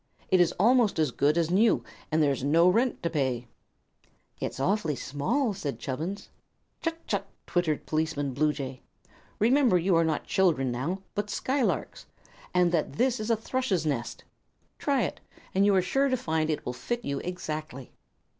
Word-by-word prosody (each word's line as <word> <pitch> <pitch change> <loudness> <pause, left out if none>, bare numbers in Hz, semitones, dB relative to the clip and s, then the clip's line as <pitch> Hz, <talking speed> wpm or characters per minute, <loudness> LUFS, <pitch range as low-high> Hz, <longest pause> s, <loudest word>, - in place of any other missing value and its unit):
It 185 -1 +6
is 175 - +4
almost 230 0 +3
as 155 -4 +2
good 145 +5 +2
as 170 -1 +1
new, 215 +5 +4 0.3
and 155 0 +3
there 145 - +3
is 135 - -3
no 165 +5 +4
rent 235 +7 +2
to 170 - +1
pay." 130 -5 -1 0.9
"It's - - -4
awfully 175 -1 +1
small!" 145 - -1
said 155 -8 -4
Chubbins. 160 +9 -4 0.5
"Chut 330 0 -3
chut!" 200 -1 -2 0.2
twittered 170 -4 0
Policeman 155 -3 -1
Bluejay. 140 -2 -1 0.6
"Remember 240 -2 +4
you 180 +1 +2
are 165 - +4
not 160 -2 0
children 155 -9 +2
now, 165 +11 -3
but 205 0 -2
skylarks, 265 +2 -1 0.4
and 180 -1 +3
that 160 -5 0
this 250 - +1
is 215 +1 -3
a 230 - +3
thrush's 220 - -1
nest. 130 -6 -2 0.6
Try - - +1
it, - - -3 0.3
and 195 +2 +4
you 200 - +4
are 185 - +3
sure 270 +9 +1
to 255 - +1
find 160 -6 -1
it 155 - -2
will 125 - -2
fit 235 - -4
you 140 0 -2
exactly." 155 -7 -5
170 Hz, 170 wpm, -28 LUFS, 145-210 Hz, 0.9 s, It